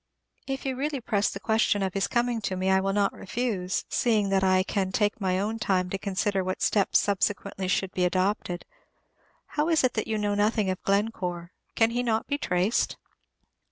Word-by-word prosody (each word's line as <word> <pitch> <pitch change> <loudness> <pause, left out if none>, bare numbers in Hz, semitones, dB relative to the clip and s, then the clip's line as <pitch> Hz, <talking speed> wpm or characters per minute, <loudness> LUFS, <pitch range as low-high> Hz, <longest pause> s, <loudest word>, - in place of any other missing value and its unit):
If 270 0 -4
you 265 -1 -1
really 280 +1 -2
press 210 -3 0
the 195 - -6
question 220 -1 +1
of 190 -1 -2
his 195 - 0
coming 240 -1 0
to 190 -2 -2
me, 185 +1 0
I 190 - +4
will 195 +1 0
not 200 0 +1
refuse, 195 -3 -2
seeing 220 -6 +1
that 195 0 +2
I 185 0 +4
can 190 -1 -1
take 205 +2 0
my 185 -1 +1
own 220 +3 -2
time 185 -4 0
to 195 - -1
consider 195 0 -1
what 185 0 -3
steps 200 -3 +3
subsequently 200 -1 -1
should 190 0 0
be 180 - -1
adopted. 185 0 0 0.8
How 305 +2 -1
is 320 -4 +3
it 255 - +2
that 215 - -2
you 220 -1 -1
know 205 -1 0
nothing 205 -1 +1
of 185 - -5
Glencore, 185 -4 -1 0.2
can 225 0 +3
he 245 +1 0
not 225 -2 0
be 285 0 -2
traced? 180 0 0
200 Hz, 195 wpm, -27 LUFS, 190-225 Hz, 0.8 s, I